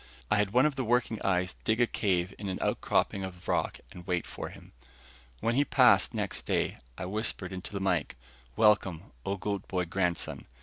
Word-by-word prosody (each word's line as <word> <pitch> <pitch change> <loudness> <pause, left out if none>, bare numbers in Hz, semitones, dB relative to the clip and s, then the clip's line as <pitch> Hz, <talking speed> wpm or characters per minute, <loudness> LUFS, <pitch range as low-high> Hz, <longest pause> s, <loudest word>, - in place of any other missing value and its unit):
I 105 - +5
had 105 -1 +2
one 125 +7 +4
of 150 - +2
the 135 -1 -2
working 120 -2 +1
eyes 90 -1 +1
dig 110 +2 +1
a 120 - +6
cave 95 -5 0
in 100 -2 -3
an 95 - -2
outcropping 95 - +1
of 90 -2 -8
rock - - 0
and 90 0 -11
wait 90 -2 0
for - - -6
him. - - -14 0.7
When 115 - +1
he 140 +4 +4
passed - - +5
next - - -2
day, - - 0 0.2
I 95 - -4
whispered 95 -2 -2
into 95 0 -6
the 100 - -3
mike: 90 -9 0 0.4
"Welcome, 95 -6 +3 0.2
O 100 +1 0
Goat 100 0 -3
boy 90 -1 -1
Grandson! 90 0 -1
95 Hz, 190 wpm, -30 LUFS, 90-110 Hz, 0.7 s, a